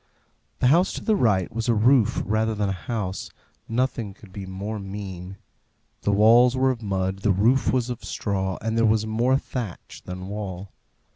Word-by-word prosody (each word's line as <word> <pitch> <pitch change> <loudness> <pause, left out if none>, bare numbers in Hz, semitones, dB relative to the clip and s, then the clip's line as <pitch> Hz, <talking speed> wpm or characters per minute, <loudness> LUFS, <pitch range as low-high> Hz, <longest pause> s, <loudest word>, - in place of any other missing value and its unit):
The 125 - +5
house 175 +3 +3
to - - -6
the 220 - +2
right 100 - +1
was 115 +1 -2
a 115 - +4
roof 120 +1 +3
rather 110 +1 0
than 105 -1 0
a - - 0
house; 95 +1 -4 0.4
nothing 115 -4 -1
could 105 -4 -16
be 100 -2 -7
more 100 +3 -5
mean. 95 -2 -7 0.6
The 105 - +1
walls 115 +5 +5
were 130 0 +3
of 120 -3 -5
mud, 95 -2 -2
the 100 +1 +2
roof 115 +8 +3
was 125 -1 0
of 120 - -7
straw, 95 -3 -2
and 115 0 -1
there 115 0 +3
was 110 0 +2
more 120 +4 +2
thatch 120 -9 -6
than 90 0 -6
wall. 100 -2 -6
105 Hz, 185 wpm, -24 LUFS, 95-120 Hz, 0.6 s, The